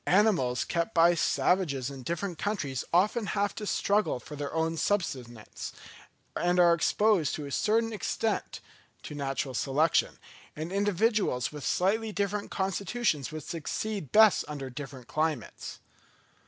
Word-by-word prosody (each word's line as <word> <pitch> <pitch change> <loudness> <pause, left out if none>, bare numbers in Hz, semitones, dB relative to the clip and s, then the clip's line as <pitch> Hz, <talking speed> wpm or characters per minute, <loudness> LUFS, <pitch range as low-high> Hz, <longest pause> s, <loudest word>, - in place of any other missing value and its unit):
Animals 180 - +3
kept 170 +5 -2
by 170 +1 +6
savages 155 -6 +1
in 135 -1 -8
different 170 +4 -3
countries 145 - -2
often 205 +5 +2
have 200 0 +1
to 210 - -6
struggle 205 -11 +1
for 150 - -10
their 145 -1 -4
own 160 0 0
subsistence, 130 - -3 0.6
and 175 +1 +1
are 175 -1 +7
exposed 185 0 +2
to 150 - -5
a 140 - -7
certain 225 +7 +1
extent 220 +1 -2 0.4
to - - -7
natural 135 -2 -2
selection, 145 +6 +1 0.4
and 155 +3 -5
individuals 205 - +1
with 150 -2 -8
slightly 215 - +1
different 200 0 -2
constitutions 195 - -1
would 155 0 -6
succeed 170 - -4
best 220 -2 +6
under 140 -3 -6
different 135 -2 -8
climates. 155 -6 -2
170 Hz, 135 wpm, -29 LUFS, 145-205 Hz, 0.6 s, are